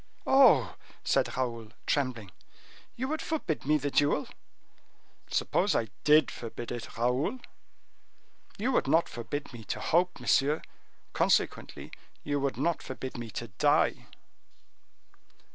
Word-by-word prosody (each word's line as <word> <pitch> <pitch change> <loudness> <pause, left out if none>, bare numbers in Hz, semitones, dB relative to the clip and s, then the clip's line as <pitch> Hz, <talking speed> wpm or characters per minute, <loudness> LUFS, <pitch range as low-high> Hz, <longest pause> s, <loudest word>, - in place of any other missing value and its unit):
"Oh!" 240 - +5 0.3
said - - +1
Raoul, 115 -3 -3
trembling, 125 -8 -1 0.6
"you 260 +2 -3
would 310 +2 -2
forbid 230 - -3
me 155 +1 +4
the 145 -1 -3
duel?" 145 +1 +2 1.0
"Suppose - - +1
I 110 - 0
did 150 +1 +5
forbid 120 0 -7
it, 120 -2 -6
Raoul?" 125 - 0 1.2
"You 235 +6 0
would - - +1
not 165 +1 +3
forbid 125 +4 -6
me 115 -2 -9
to - - -3
hope, 175 +2 +1
monsieur; 145 +3 +2 0.5
consequently - - 0 0.3
you 145 0 -1
would 140 -1 -1
not 170 - 0
forbid 130 0 -6
me 120 -2 -6
to 120 +2 -6
die." 100 - +2
140 Hz, 125 wpm, -29 LUFS, 120-160 Hz, 1.2 s, Oh